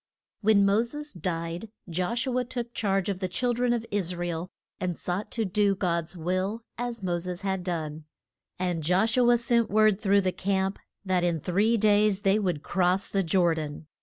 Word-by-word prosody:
WHEN 205 -2 +5
Mo 200 +3 +4
ses 295 +5 -5
died, 170 +3 -4 0.2
Josh 185 +8 -1
u 255 -2 -1
a - - 0
took 240 -1 -5
charge 195 -3 0
of 195 -3 -2
the 185 - -1
chil 245 +7 0
dren 245 +1 +1
of 235 -1 0
Is 185 -3 -1
ra 175 0 -3
el, 170 +2 -4 0.3
and 180 -2 -2
sought 185 +4 -3
to 225 -2 0
do 200 +1 +2
God's 170 -2 -2
will, 185 +6 -1
as 240 -3 -4
Mo 175 -2 0
ses 180 +1 -5
had 190 -2 -2
done. 160 -4 -4 0.5
And 180 -2 -1
Josh 185 +8 +2
u 245 -1 +4
a 240 - +6
sent 235 -1 +1
word 215 -1 +4
through 200 -1 +4
the 185 -1 0
camp 190 +1 -1 0.3
that 185 -2 +1
in 170 -2 +1
three 205 +9 +2
days 210 -1 +3
they 195 +1 +3
would 180 -7 -1
cross 185 +1 +1
the 195 - +1
Jor 175 -1 +3
dan. 155 -1 -5
195 Hz, 200 wpm, -27 LUFS, 175-220 Hz, 0.5 s, a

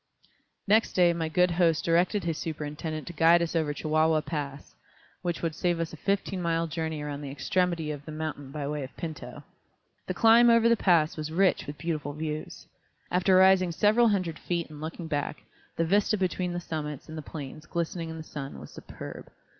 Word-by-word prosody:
Next 215 +3 +3
day 175 -2 +4
my 165 -1 -2
good 180 +2 +3
host 170 -2 +2
directed 175 +4 +2
his 165 -2 -1
superintendent 155 0 -4
to 175 - -7
guide 165 +1 +5
us 170 - -3
over 155 -3 +1
Chihuahua 155 +1 +2
Pass, 145 -3 -5 0.5
which 175 -2 -3
would 165 -1 0
save 175 +1 0
us 165 -1 -3
a - - -5
fifteen 195 +2 -1
mile 165 -1 +1
journey 160 -1 -3
around 145 -1 -5
the 140 - -6
extremity 170 +2 0
of 145 -1 -7
the 155 - -7
mountain 155 -3 -5
by 140 0 -4
way 150 0 -3
of 130 - -10
Pinto. 160 -3 -7 0.6
The - - -2
climb 230 +1 +6
over 230 0 +5
the 235 - +5
pass 170 -7 +3
was 155 0 -4
rich 185 -1 +2
with 145 0 -6
beautiful 150 -2 -3
views. 155 0 -5 0.5
After 185 +1 +3
rising 185 -1 +5
several 215 +7 +4
hundred 185 -7 0
feet 170 -3 -3
and 150 -1 -10
looking 165 +2 -5
back, 150 -1 -3 0.3
the 165 - +2
vista 205 +4 +2
between 185 -1 -1
the 175 - -2
summits 150 -4 -5
and 160 - -8
the 155 - -5
plains 150 0 -8
glistening 170 -1 -3
in 160 - -6
the 160 - -7
sun 140 -3 -7
was - - -11
superb. - - -9
165 Hz, 195 wpm, -28 LUFS, 155-180 Hz, 0.6 s, climb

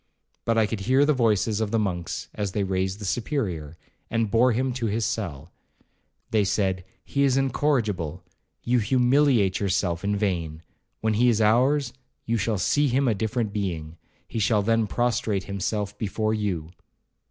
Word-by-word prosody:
But 115 0 +1
I 110 - +4
could 105 0 -3
hear 130 +8 +3
the 150 - +3
voices 110 -3 +1
of 110 - 0
the 115 - +1
monks 90 -6 -2
as 100 -3 -3
they 105 - 0
raised 95 0 -1
the 105 - -7
Superior, 95 - -2 0.3
and 115 -2 0
bore 125 +2 +4
him 130 +2 0
to 120 -2 -2
his 110 +2 0
cell. 85 -7 -4 0.8
They 110 -2 +3
said, 95 -2 0 0.2
'He 140 - -1
is 135 -2 +3
incorrigible—you 115 - -1
humiliate 125 -3 +3
yourself 90 -3 0
in 100 +1 0
vain—when 90 +2 -3
he 120 +4 +4
is 115 -2 +2
ours, 125 +4 +3 0.3
you 115 0 0
shall 110 +1 0
see 145 +9 +2
him 135 +1 +1
a 115 - +3
different 110 +1 -2
being—he 85 +1 -5
shall 105 0 +2
then 115 0 +2
prostrate 110 -4 0
himself 105 +1 -3
before 110 +1 -1
you.' 95 -7 -2
110 Hz, 155 wpm, -25 LUFS, 95-120 Hz, 0.8 s, I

